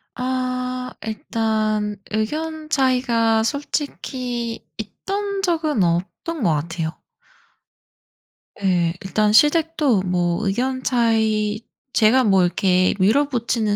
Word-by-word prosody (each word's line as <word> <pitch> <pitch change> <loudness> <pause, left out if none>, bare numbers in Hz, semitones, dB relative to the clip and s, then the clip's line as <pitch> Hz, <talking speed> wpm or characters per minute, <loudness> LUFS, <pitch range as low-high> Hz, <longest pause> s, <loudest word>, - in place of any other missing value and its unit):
아 255 0 -3
일단 215 -1 -1 0.2
의견 310 +8 -3
차이가 240 -5 +2
솔직히 250 -3 -3
있던 395 - -4
적은 315 - +1
없던 185 - -2
것 175 - +3
같아요. 165 +2 -4 1.6
예. 175 -3 +2
일단 210 +2 +1
시댁도 300 - +3
뭐 180 +2 0
의견 255 +6 -1
차이 220 -3 +1 0.3
제가 240 +4 +4
뭐 195 -4 +4
이렇게 185 +1 +2
밀어붙이는 230 -1 +1
225 Hz, 190 characters per minute, -21 LUFS, 205-260 Hz, 1.6 s, 제가